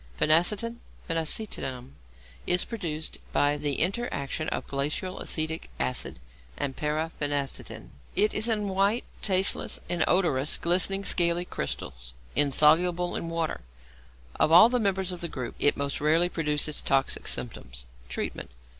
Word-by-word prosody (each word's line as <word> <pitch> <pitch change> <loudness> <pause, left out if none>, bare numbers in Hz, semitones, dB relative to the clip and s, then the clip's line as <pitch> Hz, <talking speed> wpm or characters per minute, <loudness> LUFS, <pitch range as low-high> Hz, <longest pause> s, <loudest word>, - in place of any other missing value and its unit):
=Phenacetin, 200 +9 +3 0.3
Phenacetinum=, 160 - -3 0.6
is 180 0 +3
produced 165 -9 -5
by 145 0 +2
the 145 -1 -1
interaction 160 - -1
of - - -3
glacial 150 +7 -2
acetic 160 0 -1
acid 125 - -2 0.4
and 135 -2 -3
para 155 +2 -2
phenetidin. 140 - -4 0.3
It 210 +2 +3
is 215 +2 +2
in 210 -3 0
white, 195 +5 +1 0.2
tasteless, 190 -1 +2
inodorous, 170 -5 +1
glistening, 185 +3 +1
scaly 175 0 +3
crystals, 60 - -6 0.2
insoluble 160 +5 +4
in 165 - -3
water. 165 - -2 0.8
Of 155 - +3
all 180 +7 +9
the 250 0 +1
members 190 -3 0
of 180 - -6
the 170 - -2
group, 125 -6 -6
it 145 - +3
most 140 0 -3
rarely 165 +4 +3
produces 150 -2 0
toxic 135 -1 0
symptoms. 60 -1 -4 0.2
_Treatment. - - -4
165 Hz, 130 wpm, -27 LUFS, 145-185 Hz, 0.8 s, all